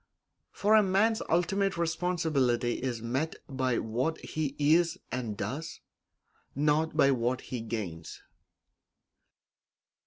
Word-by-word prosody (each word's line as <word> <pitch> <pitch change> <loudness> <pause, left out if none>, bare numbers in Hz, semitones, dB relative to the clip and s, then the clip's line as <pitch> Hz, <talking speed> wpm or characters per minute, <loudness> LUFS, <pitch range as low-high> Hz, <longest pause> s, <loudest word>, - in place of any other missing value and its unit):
For 210 +2 +1
a 220 - +8
man's 210 +3 +2
ultimate 195 +3 +1
responsibility 160 -8 0
is 120 -3 -3
met 135 +7 -1
by 130 -3 0
what 125 +8 -1
he 150 -3 -3
is 165 +4 +3
and 120 -5 -3
does, 135 +11 -4 0.8
not 150 +3 +1
by 140 - +5
what 125 0 0
he 125 -3 -5
gains. 105 -8 -6
145 Hz, 105 wpm, -29 LUFS, 120-170 Hz, 0.8 s, a